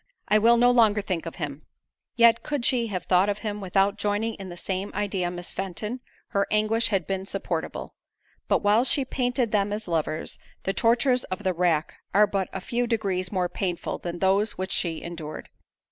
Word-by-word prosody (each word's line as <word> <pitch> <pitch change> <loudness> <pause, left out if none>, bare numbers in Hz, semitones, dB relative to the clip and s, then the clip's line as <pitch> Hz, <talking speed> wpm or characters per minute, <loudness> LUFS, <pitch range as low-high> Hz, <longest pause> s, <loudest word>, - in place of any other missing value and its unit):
I 215 - +4
will 235 +2 +5
no 245 +1 +5
longer 220 -4 +4
think 175 -3 -3
of 165 - -6
him." 150 -3 -5 0.5
Yet 235 -2 +6
could 290 -5 -2
she 240 -3 +2
have 185 -4 -3
thought 185 +2 +3
of 205 - 0
him, 210 -1 -3
without 195 +2 +1
joining 210 +2 0
in 195 -3 -8
the 175 - -8
same 190 +3 -3
idea 195 -3 -1
Miss 175 0 -6
Fenton, 200 +6 -4 0.3
her 200 -3 +1
anguish 215 +2 +2
had 195 -5 0
been 190 -1 -2
supportable; - - -4 0.5
but - - +2
while 210 +3 +4
she 270 +1 +1
painted 245 -3 0
them 205 -1 +1
as 210 0 -4
lovers, 160 -2 -2 0.2
the 195 - -1
tortures 245 +3 +3
of 185 +3 -5
the 185 -2 +1
rack 170 -3 0 0.2
are 210 +1 +7
but 195 -3 -2
a 190 - -5
few 240 +5 -1
degrees 195 -6 -1
more 185 -3 +1
painful 175 -1 -3
than 175 0 -5
those 195 +4 +2
which 190 +1 -3
she 165 -3 -1
endured. 165 -3 -7
200 Hz, 190 wpm, -26 LUFS, 180-225 Hz, 0.5 s, are